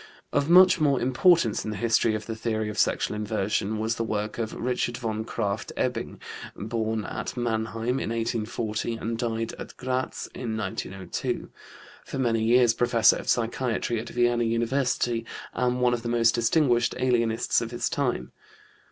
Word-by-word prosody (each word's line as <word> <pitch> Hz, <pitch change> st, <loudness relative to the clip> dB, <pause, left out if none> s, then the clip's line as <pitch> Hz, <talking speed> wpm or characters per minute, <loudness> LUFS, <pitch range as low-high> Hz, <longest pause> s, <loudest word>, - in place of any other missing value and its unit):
Of 145 Hz, +1 st, +1 dB
much 185 Hz, 0 st, +7 dB
more 140 Hz, -4 st, +3 dB
importance 130 Hz, -, +3 dB
in -, -, -4 dB
the 105 Hz, -, -4 dB
history 115 Hz, 0 st, +2 dB
of 105 Hz, 0 st, -5 dB
the 115 Hz, -, -4 dB
theory 110 Hz, -1 st, -2 dB
of 105 Hz, 0 st, -4 dB
sexual -, -, +1 dB
inversion 105 Hz, 0 st, -1 dB
was 110 Hz, +2 st, -1 dB
the 115 Hz, -, 0 dB
work 105 Hz, 0 st, -3 dB
of 110 Hz, -1 st, -2 dB
Richard 120 Hz, -1 st, -1 dB
von 110 Hz, -2 st, -3 dB
Krafft 105 Hz, -3 st, -3 dB
Ebing -, -, -2 dB, 0.4 s
(born 110 Hz, 0 st, -2 dB
at -, -, -5 dB
Mannheim 115 Hz, +1 st, -1 dB
in -, -, -3 dB
1840 115 Hz, 0 st, -2 dB
and 115 Hz, +1 st, -3 dB
died 115 Hz, -1 st, -2 dB
at -, -, -9 dB
Graz 130 Hz, 0 st, -2 dB
in 115 Hz, -3 st, -4 dB
1902), 95 Hz, -2 st, -4 dB, 0.5 s
for -, -, -6 dB
many 115 Hz, -4 st, +1 dB
years 120 Hz, 0 st, +5 dB
professor 115 Hz, -2 st, +4 dB
of -, -, -6 dB
psychiatry 120 Hz, 0 st, 0 dB
at 115 Hz, -, -6 dB
Vienna 120 Hz, 0 st, +2 dB
University 120 Hz, 0 st, 0 dB, 0.3 s
and 125 Hz, 0 st, 0 dB
one 125 Hz, -1 st, +4 dB
of 120 Hz, -, -1 dB
the 120 Hz, -, -4 dB
most 115 Hz, -1 st, +3 dB
distinguished 120 Hz, 0 st, +2 dB
alienists 120 Hz, -2 st, +1 dB
of 115 Hz, -, -3 dB
his 120 Hz, 0 st, -2 dB
time. 120 Hz, -, -1 dB
115 Hz, 160 wpm, -26 LUFS, 110-125 Hz, 0.5 s, much